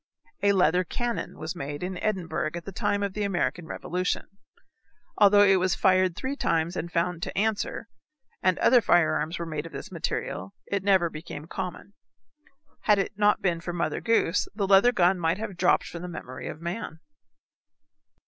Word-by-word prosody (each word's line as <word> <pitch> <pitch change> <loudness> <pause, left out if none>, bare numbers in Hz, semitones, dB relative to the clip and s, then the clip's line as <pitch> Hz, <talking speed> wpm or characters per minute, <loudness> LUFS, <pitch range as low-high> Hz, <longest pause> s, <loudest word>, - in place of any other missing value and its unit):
A 200 0 +4
leather 180 -1 +3
cannon 240 +6 -4
was 160 +3 -5
made 145 0 -5
in 180 0 -4
Edinburgh 180 -7 -1
at 170 - -6
the 195 - -6
time 205 +2 -1
of 200 -1 -2
the 210 - -4
American 175 -4 -1
revolution. 180 +3 -2 0.9
Although 205 0 +7
it 195 -1 +5
was 185 0 +1
fired 185 -2 +3
three 265 +7 -3
times 165 - 0
and 170 -1 -4
found 175 0 -1
to - - -5
answer, 220 +2 -1 0.5
and 185 -1 +2
other 245 -1 +5
firearms 170 -2 +2
were 170 - -4
made 155 -1 -4
of - - -13
this - - -7
material, 95 +1 -4
it 200 -1 -2
never 190 -4 +3
became 155 -1 -8
common. 185 +3 -6 0.9
Had 210 -1 +5
it 195 - -1
not 210 0 +2
been 170 -3 +1
for 175 +1 -5
Mother 170 - -2
Goose 225 -7 +2
the 205 -2 0
leather 195 +5 +6
gun 185 -4 +3
might 165 +1 +1
have 210 -3 -5
dropped 175 +1 +3
from 170 - -7
the 180 - -5
memory 145 -7 -7
of - - -7
man. 170 -1 -5
180 Hz, 175 wpm, -27 LUFS, 170-200 Hz, 0.9 s, Although